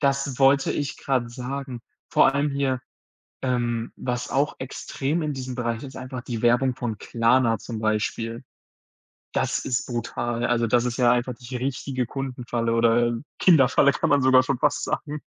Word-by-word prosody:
Das 140 -2 0
wollte 135 0 +4
ich 145 -2 -3
grad 125 -3 -1
sagen. 125 0 -5 0.3
Vor - - +4
allem 145 +1 +1
hier, 135 -2 0 0.6
ähm, 120 -3 -1
was 125 -1 -3
auch 140 +1 +1
extrem 140 +4 -3
in 150 -1 -1
diesem 130 -1 -5
Bereich 120 -2 -2
ist, 140 -1 -9
einfach 130 -1 -6
die 120 -3 -5
Werbung 120 +2 +3
von 120 -4 -4
Klarna 115 0 +2
zum 115 +2 -6
Beispiel. 110 +2 -1 0.9
Das - - 0
ist 125 -1 -2
brutal. 120 0 -2
Also, 120 -1 +1
das 120 +2 +2
ist 120 -1 -2
ja 125 -2 +4
einfach 125 0 0
die 125 +1 -7
richtige 130 -1 -2
Kundenfalle 125 -3 -3
oder, 115 +1 +3
ähm, 120 +4 -4
Kinderfalle, 140 -4 +5
kann - - -1
man 145 -2 +4
sogar 130 0 +6
schon 130 0 -1
fast 145 +2 +1
sagen. 150 0 -3
125 Hz, 170 wpm, -24 LUFS, 120-135 Hz, 0.9 s, sogar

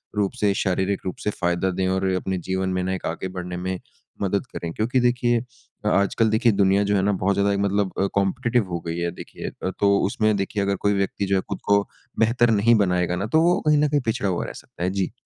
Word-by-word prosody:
रूप 100 -2 +1
से 100 -2 +3
शारीरिक 95 +1 0
रूप 90 - -3
से 105 - 0
फ़ायदा 90 -1 0
दें 95 +1 -1
और 95 +1 0
अपने 95 0 -2
जीवन 95 0 -1
में 90 - 0
ना 95 +1 -1
एक 95 - -5
आगे 85 +3 -3
बढ़ने 90 0 -4
में 95 0 -3 0.4
मदद 100 +4 0
करें 85 -1 -4
क्योंकि 125 +4 +1
देखिए 120 -1 +2 0.5
आजकल 105 +3 +2
देखिए 110 +1 +3
दुनिया 100 0 +3
जो 100 0 +1
है 95 - +2
ना, 100 - +2
बहुत 100 0 +1
ज़्यादा 100 0 +2
मतलब 100 -1 0
अ, 100 - +2
कॉम्पिटेटिव 115 +2 +1
हो 85 -1 -2
गई 85 - -3
है। 85 0 -1
देखिए - - -7 0.3
तो 100 -1 +4
उसमें 110 +1 +1
देखिए 100 +1 -1
अगर 100 0 0
कोई 100 +1 +1
व्यक्ति 100 0 -1
जो 95 0 +1
है 95 - +2
खुद - - -3
को 100 0 +4 0.4
बेहतर 115 +1 +3
नहीं 110 +3 +4
बनाएँगा 90 -4 +1
ना 95 - -2
तो - - +5
वो 175 +3 +3
कहीं 150 -1 +5
न 150 - +4
कहीं 145 -1 +1
पिछड़ा 110 -3 0
हुआ 90 - -1
रह - - -6
सकता - - -9
है 90 - +1
जी। 95 -2 -1
100 Hz, 235 wpm, -23 LUFS, 95-110 Hz, 0.5 s, तो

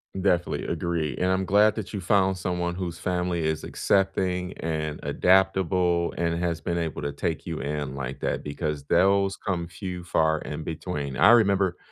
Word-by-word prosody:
Definitely, 90 -2 0
agree, 80 -5 -2
and 90 0 +1
I'm 95 0 +1
glad 105 +3 +4
that 110 -1 -6
you 100 - -3
found 95 0 +2
someone 90 -1 -2
whose 85 -2 -4
family 90 -2 -1
is 80 0 -1
accepting, 95 -2 0
and 80 -2 -3
adaptable, 90 -2 +2
and 85 0 0
has 85 -2 -1
been 85 +1 -2
able 80 -2 -3
to 70 - -2
take 80 +2 -3
you 80 -2 -4
in 75 -2 -3
like 70 -1 -5
that - - -1
because 75 0 -3
those 100 +4 +3
come 85 -4 -3
few 90 +1 -6
far 80 -2 +1
in 75 +2 -6
between. 75 -4 -4
I - - +7
remember 100 -5 +4
85 Hz, 170 wpm, -26 LUFS, 80-95 Hz, -, I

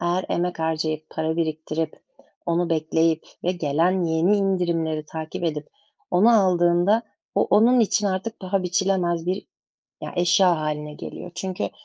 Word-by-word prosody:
eğer 175 +2 0
emek 175 0 -1
harcayıp, 155 -1 -2
para 160 +1 -2
biriktirip, 160 -1 -3 0.4
onu 170 0 0
bekleyip 160 0 +1 0.2
ve 180 - +2
gelen 175 +2 +1
yeni 165 +5 +2
indirimleri 170 -5 0
takip 160 +2 -6
edip 150 -2 -3 0.4
onu 195 +7 +5
aldığında 175 +4 +3 0.3
o - - +3
onun 240 +3 +4
için 210 -1 +2
artık 195 +4 -3
paha 190 0 -1
biçilemez 180 -2 0
bir, 185 +3 -2 0.6
ya, - - -5
eşya 175 0 +4
hâline 150 -1 -3
geliyor. 180 - -8
Çünkü 190 +1 -3
175 Hz, 135 wpm, -23 LUFS, 160-185 Hz, 0.6 s, onu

